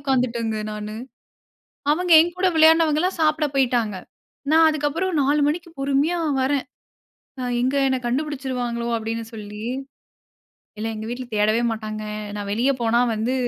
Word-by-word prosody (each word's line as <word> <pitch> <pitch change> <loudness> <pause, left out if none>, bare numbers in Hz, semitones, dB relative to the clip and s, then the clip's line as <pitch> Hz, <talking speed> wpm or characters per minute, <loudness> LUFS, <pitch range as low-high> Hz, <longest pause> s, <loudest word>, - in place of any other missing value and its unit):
உக்காந்துட்டேங்க 240 -5 0
நானு. 210 0 -6 1.0
அவங்க 355 +3 0
என் 345 +1 -2
கூட 375 - +2
விளையாட்னவங்கல்லாம் 320 +2 +4
சாப்ட 305 0 +2
போய்டாங்க. 240 -6 +1 0.6
நான் 320 0 +6
அதுக்கு 295 -1 -1
அப்பறம் 370 +2 -1
4 290 +2 +2
மணிக்கு 340 +3 -2
பொறுமையா 280 +5 +1 0.2
வறேன். 275 +1 0 0.8
அ - - -3 0.2
"எங்க 260 +2 +1
என்ன 260 -1 +1
கண்டுபிடிச்சுடுவாங்களோ?" 250 -3 -2
அப்டின்னு 225 0 -4
சொல்லி 210 0 -8 1.2
இல்ல 225 - -2
எங்க 215 0 -6
வீட்ல 250 +1 -5
தேடவே 215 +2 +2
மாட்டாங்க. 215 -1 -5 0.3
நான் 205 - -5
வெளிய 245 +6 +2
போனா 235 +1 +2 0.2
வந்து, 225 +4 -1
260 Hz, 135 wpm, -22 LUFS, 225-305 Hz, 1.2 s, நான்